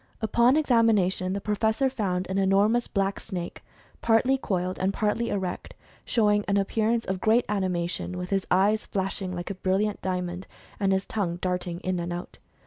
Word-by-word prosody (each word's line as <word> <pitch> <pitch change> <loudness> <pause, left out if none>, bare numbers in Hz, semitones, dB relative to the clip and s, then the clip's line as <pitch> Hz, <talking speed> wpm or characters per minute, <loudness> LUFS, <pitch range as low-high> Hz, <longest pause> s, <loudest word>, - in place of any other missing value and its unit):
Upon 235 +5 +3
examination 220 -9 +2
the 200 - -2
Professor 220 +5 +1
found 195 -8 -1
an 190 +1 -1
enormous 200 +5 +3
black 195 -1 -1
snake, 175 -2 -6 0.4
partly 235 +4 +3
coiled, 185 -7 -2
and 190 +1 +1
partly 215 +3 0
erect, 190 -3 -4 0.3
showing 210 -3 +2
an 200 - +2
ap 195 -1 0
pearance 225 +1 +1
of 190 -1 -3
great 225 +2 +3
animation, 180 -3 -2
with 180 +1 -5
his 195 -1 0
eyes 205 +4 +3
flashing 190 -1 -3
like 175 +1 -4
a 185 - -9
brilliant 200 +3 0
diamond, 180 0 -3 0.3
and 195 -2 +2
his 190 0 +1
tongue 190 -6 -2
darting 180 -1 -3
in 185 -1 -1
and 170 0 -3
out. 175 +1 -6
195 Hz, 170 wpm, -26 LUFS, 185-220 Hz, 0.4 s, Upon